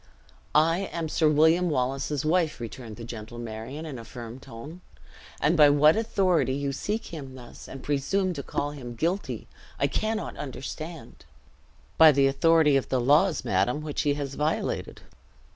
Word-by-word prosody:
"I 165 Hz, +5 st, +3 dB
am 165 Hz, -2 st, -3 dB
Sir 155 Hz, 0 st, +3 dB
William 160 Hz, +4 st, +4 dB
Wallace's 135 Hz, +1 st, -1 dB
wife," 160 Hz, -2 st, +1 dB
returned 115 Hz, -1 st, -7 dB
the 115 Hz, -, -9 dB
gentle 115 Hz, 0 st, -8 dB
Marion, 120 Hz, +6 st, -6 dB
in 140 Hz, -6 st, -6 dB
a -, -, -8 dB
firm 120 Hz, +1 st, -9 dB
tone; 140 Hz, +7 st, -10 dB, 0.6 s
"and 155 Hz, +4 st, +2 dB
by 150 Hz, -3 st, +7 dB
what 150 Hz, +2 st, +5 dB
authority 190 Hz, -10 st, +1 dB
you 140 Hz, 0 st, -2 dB
seek 210 Hz, +7 st, -4 dB
him 135 Hz, -5 st, -7 dB
thus, 120 Hz, -2 st, -12 dB
and 135 Hz, -1 st, -9 dB
presume 180 Hz, +7 st, 0 dB
to 145 Hz, -, -5 dB
call 145 Hz, +1 st, -3 dB
him 125 Hz, -5 st, -8 dB
guilty, 175 Hz, -, -2 dB, 0.3 s
I -, -, +3 dB
cannot 215 Hz, 0 st, -2 dB
understand." 155 Hz, +4 st, -7 dB, 0.7 s
"By 160 Hz, -1 st, +10 dB
the 140 Hz, -1 st, +3 dB
authority 150 Hz, +1 st, +4 dB
of 135 Hz, -, -3 dB
the 130 Hz, -, +1 dB
laws, 150 Hz, +8 st, +3 dB
madam, 100 Hz, +10 st, +1 dB
which 150 Hz, -2 st, -2 dB
he 145 Hz, -1 st, +1 dB
has 140 Hz, -1 st, -4 dB
violated." 150 Hz, +3 st, -2 dB
145 Hz, 160 wpm, -27 LUFS, 130-165 Hz, 0.7 s, By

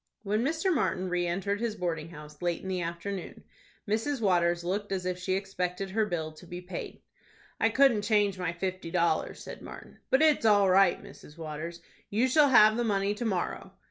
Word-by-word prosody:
When 210 Hz, +2 st, 0 dB
Mr. 325 Hz, +6 st, +1 dB
Martin 185 Hz, -, 0 dB
re 175 Hz, 0 st, 0 dB
entered 195 Hz, +3 st, -1 dB
his 230 Hz, -2 st, -1 dB
boarding 165 Hz, -4 st, -3 dB
house 150 Hz, -2 st, -12 dB
late 175 Hz, -1 st, -1 dB
in -, -, -6 dB
the 185 Hz, -1 st, -1 dB
afternoon, 170 Hz, +3 st, -5 dB, 0.4 s
Mrs. 225 Hz, +7 st, 0 dB
Waters 175 Hz, -4 st, +2 dB
looked 200 Hz, +4 st, -2 dB
as 185 Hz, -2 st, -2 dB
if 180 Hz, 0 st, -2 dB
she 185 Hz, +1 st, -1 dB
expected 190 Hz, -1 st, -3 dB
her 215 Hz, +1 st, +1 dB
bill 160 Hz, -5 st, -3 dB
to 155 Hz, +3 st, -15 dB
be 175 Hz, +1 st, -6 dB
paid. 180 Hz, +1 st, -7 dB, 0.6 s
"I -, -, +3 dB
couldn't 265 Hz, -6 st, +4 dB
change 205 Hz, -3 st, +1 dB
my 180 Hz, -2 st, -1 dB
fifty 185 Hz, 0 st, -4 dB
dollars," 170 Hz, 0 st, 0 dB
said -, -, -9 dB
Martin; -, -, -11 dB
"but 265 Hz, +4 st, +4 dB
it's 305 Hz, -5 st, +4 dB
all 205 Hz, -3 st, +5 dB
right, 190 Hz, -1 st, +5 dB
Mrs. 150 Hz, -, -14 dB
Waters. 165 Hz, +2 st, -6 dB, 0.3 s
You 225 Hz, +5 st, +2 dB
shall 290 Hz, +2 st, +5 dB
have 215 Hz, -3 st, +6 dB
the 240 Hz, -, +1 dB
money 200 Hz, -2 st, +1 dB
to 220 Hz, +3 st, -5 dB
morrow." 190 Hz, -5 st, -2 dB
190 Hz, 195 wpm, -29 LUFS, 175-215 Hz, 0.6 s, have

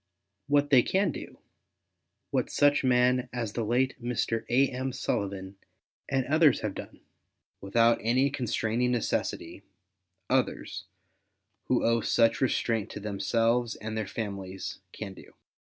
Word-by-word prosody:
What 145 Hz, 0 st, +2 dB
they 130 Hz, -3 st, +8 dB
can 190 Hz, +5 st, +1 dB
do, -, -, -9 dB, 0.9 s
what -, -, 0 dB
such 145 Hz, 0 st, +3 dB
men 125 Hz, 0 st, +3 dB
as 115 Hz, -4 st, -3 dB
the 115 Hz, -, -2 dB
late 125 Hz, +4 st, 0 dB
Mr. 115 Hz, -1 st, -1 dB
A. 130 Hz, +3 st, +4 dB
M. 130 Hz, +1 st, -3 dB
Sullivan 100 Hz, -5 st, -3 dB, 0.5 s
and 135 Hz, -2 st, +1 dB
others 155 Hz, -2 st, +4 dB
have 105 Hz, -2 st, -2 dB
done, -, -, -9 dB, 0.6 s
without 115 Hz, +4 st, +3 dB
any 130 Hz, +6 st, +2 dB
constraining 120 Hz, -2 st, 0 dB
necessity, 120 Hz, -3 st, -2 dB, 0.7 s
others, -, -, -1 dB, 0.8 s
who -, -, +1 dB
owe 115 Hz, 0 st, +3 dB
such 115 Hz, +1 st, +2 dB
restraint 115 Hz, -4 st, 0 dB
to -, -, -7 dB
themselves 115 Hz, +4 st, 0 dB
and 110 Hz, +1 st, -6 dB
their 110 Hz, -2 st, -2 dB
families, 95 Hz, -3 st, -5 dB
can 100 Hz, -3 st, -7 dB
do. -, -, -15 dB
120 Hz, 130 wpm, -28 LUFS, 110-130 Hz, 0.9 s, they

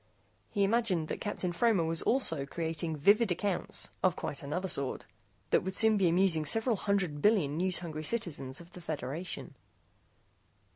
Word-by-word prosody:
He 200 Hz, -, 0 dB
imagined 195 Hz, -7 st, +1 dB
that -, -, -4 dB
Captain 200 Hz, -4 st, -2 dB
Fromer 200 Hz, 0 st, +2 dB
was 165 Hz, 0 st, -1 dB
also 165 Hz, -, +1 dB
creating 160 Hz, +1 st, -3 dB
vivid 205 Hz, +7 st, +4 dB
accounts 190 Hz, +1 st, -1 dB
of 185 Hz, -3 st, +2 dB
quite 140 Hz, -, -5 dB
another 180 Hz, +7 st, -3 dB
sort 140 Hz, -6 st, -2 dB, 0.5 s
that -, -, +4 dB
would 190 Hz, +1 st, -4 dB
soon 220 Hz, -1 st, +6 dB
be 190 Hz, -4 st, +3 dB
amusing 170 Hz, -2 st, +2 dB
several 225 Hz, -, +3 dB
hundred 190 Hz, -7 st, -1 dB
billion 185 Hz, -9 st, +3 dB
news 180 Hz, +2 st, +1 dB
hungry 155 Hz, -3 st, -6 dB
citizens 150 Hz, -, -2 dB
of 170 Hz, +1 st, -14 dB
the 180 Hz, -, -10 dB
Federation. 155 Hz, +2 st, -4 dB
175 Hz, 155 wpm, -31 LUFS, 155-200 Hz, 0.5 s, soon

